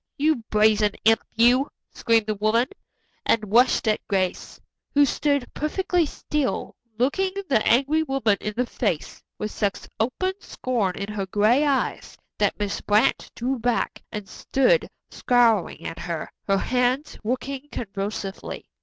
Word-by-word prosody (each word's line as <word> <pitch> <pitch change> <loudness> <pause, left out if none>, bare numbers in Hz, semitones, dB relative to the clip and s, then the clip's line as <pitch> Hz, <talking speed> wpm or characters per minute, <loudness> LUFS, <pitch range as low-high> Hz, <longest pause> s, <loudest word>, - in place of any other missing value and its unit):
"You 310 +1 +3
brazen 210 -1 +3
imp, 225 0 +5
you," 245 +4 +4 0.2
screamed 225 -2 +2
the 215 - -1
woman, 215 +4 +2 0.6
and 215 -2 0
rushed 245 0 +4
at 215 - +2
Grace, 190 -3 -2 0.4
who 290 0 +6
stood 285 -1 0
perfectly 345 +2 0
still, 295 -2 -2 0.2
looking 330 +10 +1 0.2
the 240 -8 +2
angry 280 +6 +3
woman 270 -9 +1
in 210 0 -4
the 250 - +2
face 205 -9 -3 0.2
with 210 - -4
such 200 -2 -2
open 315 +12 0
scorn 225 - -2
in 200 +1 -5
her 195 -2 -3
gray 215 +8 +3
eyes 275 -2 -1 0.2
that - - +1
Miss 205 -1 -2
Brant 210 +1 +2
drew 255 +2 -2
back 240 +1 -1
and 210 -2 -6
stood 270 - +1 0.2
scowling 235 -6 +2
at 165 - -5
her, 170 -2 -4 0.2
her 195 -1 +3
hands 250 +6 0
working 260 +4 -3
convulsively. 195 -2 -5
235 Hz, 140 wpm, -24 LUFS, 210-270 Hz, 0.6 s, who